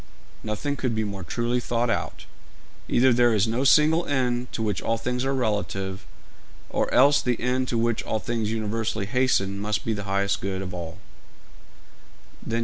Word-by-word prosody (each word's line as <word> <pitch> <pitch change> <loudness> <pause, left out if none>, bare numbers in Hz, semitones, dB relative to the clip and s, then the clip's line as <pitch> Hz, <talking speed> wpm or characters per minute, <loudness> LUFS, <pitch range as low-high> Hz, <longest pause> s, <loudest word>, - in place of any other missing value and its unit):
'Nothing 110 +7 -2
could 125 -4 -2
be 110 - 0
more 100 -3 -5
truly 120 +7 -1
thought 120 0 0
out. - - -3 0.6
Either 130 +1 +4
there 120 -1 +4
is 105 +1 +2
no 115 +4 0
single 155 +4 +5
end 125 -3 0
to 110 - -3
which 105 -4 -1
all 115 - 0
things 125 +2 -2
are 135 0 0
relative, 100 -5 -2 0.6
or - - 0
else 145 +3 +5
the 125 -2 -1
end 130 +1 0
to 120 - -1
which 115 0 +1
all 110 - -2
things 115 -1 -2
universally 110 -1 -2
hasten 100 -4 +1
must 105 +1 -2
be 115 - 0
the 105 -1 -5
highest 100 0 0
good 95 0 -3
of 90 -1 -6
all.' 85 -2 -6
115 Hz, 170 wpm, -25 LUFS, 105-125 Hz, 0.6 s, single